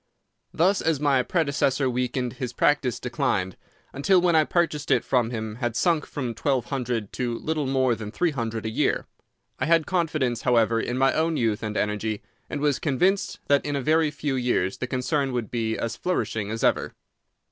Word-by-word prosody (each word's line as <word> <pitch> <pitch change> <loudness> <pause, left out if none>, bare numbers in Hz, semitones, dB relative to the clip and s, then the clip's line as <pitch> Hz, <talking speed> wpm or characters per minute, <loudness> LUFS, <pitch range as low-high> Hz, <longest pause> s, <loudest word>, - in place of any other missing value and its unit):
Thus 190 +5 +2
as 160 -3 +1
my 140 -3 +3
predecessor 140 -2 +1
weakened 125 0 -1
his 125 -1 -5
practice 140 -2 +1
declined, 100 -6 -1 0.4
until 180 +7 +3
when 175 -1 +3
I 155 -1 +5
purchased 160 -4 0
it - - +3
from 120 -3 +2
him 110 -2 -4
it 105 - -10
had 120 -3 -2
sunk 165 +3 +1
from 125 -5 -4
twelve 125 +2 0
hundred 120 -6 -3
to 120 -2 -2
little 155 -3 -2
more 130 -2 +2
than 110 -2 -5
three 170 +9 0
hundred 115 -5 -3
a - - -1
year. - - 0 0.5
I - - 0
had 165 -1 +4
confidence, 155 -10 0
however, 115 -2 +3
in 120 - -2
my 135 +1 +3
own 160 0 +1
youth 110 -2 0
and 105 -1 -3
energy, 105 0 -1 0.3
and 145 - -4
was 145 -2 +1
convinced 180 +7 0
that 140 0 +3
in 145 -1 -2
a 140 - -1
very 160 +2 +3
few 145 -1 -3
years 120 -7 0
the 130 - -2
concern 130 +2 -1
would 120 -4 -3
be 115 -2 -1
as 115 0 -3
flourishing 115 - -2
as 115 +1 -4
ever. - - +1
130 Hz, 190 wpm, -25 LUFS, 115-150 Hz, 0.5 s, I